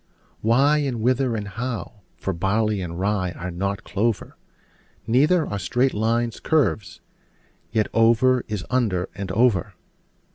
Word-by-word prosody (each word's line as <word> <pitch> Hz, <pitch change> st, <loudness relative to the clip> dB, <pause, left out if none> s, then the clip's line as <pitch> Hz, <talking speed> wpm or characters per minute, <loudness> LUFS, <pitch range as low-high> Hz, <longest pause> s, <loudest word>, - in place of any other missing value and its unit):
Why, 135 Hz, +7 st, +4 dB
and 135 Hz, -5 st, -2 dB
whither, 125 Hz, 0 st, +1 dB
and 105 Hz, -2 st, -4 dB
how? 110 Hz, -1 st, -5 dB, 0.2 s
for 95 Hz, -, -3 dB
barley 100 Hz, +3 st, 0 dB
and 85 Hz, -1 st, -5 dB
rye 95 Hz, -2 st, 0 dB
are 90 Hz, +1 st, -6 dB
not 100 Hz, +3 st, -3 dB
clover: 110 Hz, +2 st, -2 dB, 0.7 s
Neither 150 Hz, +8 st, +3 dB
are 100 Hz, -, -4 dB
straight 125 Hz, +8 st, +1 dB
lines 115 Hz, +2 st, 0 dB
curves: 145 Hz, -10 st, 0 dB, 0.7 s
yet 110 Hz, -2 st, +1 dB
over 120 Hz, +2 st, +4 dB
is 105 Hz, -4 st, -4 dB
under 105 Hz, -8 st, 0 dB
and 95 Hz, -2 st, -5 dB
over. 105 Hz, -2 st, +2 dB
110 Hz, 135 wpm, -23 LUFS, 100-125 Hz, 0.7 s, Why